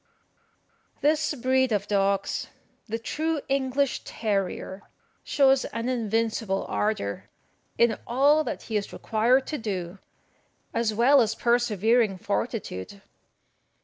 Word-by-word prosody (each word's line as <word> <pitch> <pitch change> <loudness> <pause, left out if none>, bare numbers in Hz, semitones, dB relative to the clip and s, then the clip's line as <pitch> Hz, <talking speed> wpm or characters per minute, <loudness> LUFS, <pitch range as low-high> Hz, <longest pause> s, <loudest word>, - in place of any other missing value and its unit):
This 305 +1 +2
breed 260 0 +2
of 205 -2 0
dogs, 200 -1 0 0.4
the 225 +1 -2
true 310 +7 -2
English 270 0 0
terrier, 195 -2 -3 0.4
shows 270 -2 +3
an 230 +2 -3
invincible 225 -4 -1
ardour 210 - -2 0.5
in 235 -1 +3
all 285 +6 +4
that - - -5
he 220 - -2
is 200 - -4
required 240 +5 +2
to 305 - -4
do, 190 -4 -4 0.7
as 230 -1 +1
well 250 +6 +5
as 220 -2 0
persevering 230 -3 +2
fortitude. 200 - -4
230 Hz, 110 wpm, -26 LUFS, 205-260 Hz, 0.7 s, well